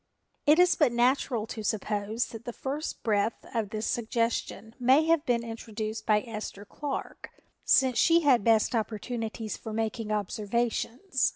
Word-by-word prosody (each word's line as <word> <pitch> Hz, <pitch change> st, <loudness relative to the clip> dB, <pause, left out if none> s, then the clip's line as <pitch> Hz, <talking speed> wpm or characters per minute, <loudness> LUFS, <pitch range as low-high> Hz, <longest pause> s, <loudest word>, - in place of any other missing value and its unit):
It 300 Hz, +2 st, +7 dB
is 360 Hz, 0 st, +6 dB
but 295 Hz, -6 st, +3 dB
natural 240 Hz, -1 st, +1 dB
to 220 Hz, -1 st, -6 dB
suppose 210 Hz, +2 st, -1 dB
that 230 Hz, -1 st, -9 dB
the 240 Hz, -, -5 dB
first 285 Hz, +6 st, -4 dB
breath 215 Hz, 0 st, 0 dB
of 225 Hz, -4 st, -1 dB
this 215 Hz, +1 st, -3 dB
suggestion 230 Hz, -1 st, -2 dB
may 260 Hz, +5 st, +5 dB
have 325 Hz, -2 st, +3 dB
been 235 Hz, -1 st, +2 dB
introduced 225 Hz, -1 st, -5 dB
by 210 Hz, -1 st, +4 dB
Esther 215 Hz, -3 st, -6 dB
Clark, 285 Hz, +6 st, -6 dB, 0.3 s
since 260 Hz, -3 st, +4 dB
she 335 Hz, 0 st, +5 dB
had 265 Hz, -8 st, +4 dB
best 225 Hz, +2 st, +3 dB
opportunities 225 Hz, 0 st, -3 dB
for 220 Hz, -, -7 dB
making 225 Hz, 0 st, -2 dB
observations. 235 Hz, -, -1 dB
230 Hz, 150 wpm, -28 LUFS, 215-255 Hz, 0.3 s, It